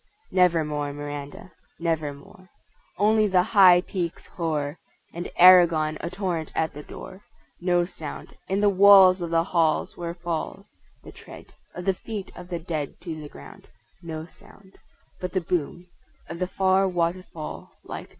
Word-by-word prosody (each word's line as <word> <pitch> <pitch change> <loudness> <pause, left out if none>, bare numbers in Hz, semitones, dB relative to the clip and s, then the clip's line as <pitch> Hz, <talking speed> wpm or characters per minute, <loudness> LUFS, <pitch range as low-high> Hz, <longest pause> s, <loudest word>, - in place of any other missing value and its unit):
Never 175 -4 +3
more; 145 -1 -3
Miranda, 145 +4 -8 0.3
Never 160 -3 -1
more. 185 +6 -16 0.5
Only 215 +1 +3
the 185 -2 +3
high 185 -3 +6
peaks 175 -3 -5
hoar; 155 -3 -3 0.3
And 175 +1 -5
Aragon 170 -4 +6
a 170 - -3
torrent 175 -4 -3
at 160 -1 -1
the 150 - -8
door. 185 +5 -11 0.4
No 175 -1 +1
sound 160 -4 -9
In 195 +2 0
the 205 - +4
walls 190 -1 +7
of 170 - -3
the 165 0 +2
halls 165 -3 0
where 170 -1 -5
falls 170 -2 -5 0.3
The - - -11
tread - - -14 0.2
Of 180 - -7
the 195 - +2
feet 205 +1 -7
of 180 0 -11
the 175 - -3
dead 160 -4 -5
to 160 -3 -6
the 150 - -9
ground, 70 - -14 0.3
No 160 -2 -6
sound: 190 +2 -19 0.4
But 180 -1 -5
the 185 - 0
boom 175 +1 -3 0.4
Of 170 - -7
the 185 - -1
far 190 +1 +2
waterfall 175 -2 -4
like - - -7
doom. - - -31
175 Hz, 160 wpm, -25 LUFS, 160-185 Hz, 0.5 s, walls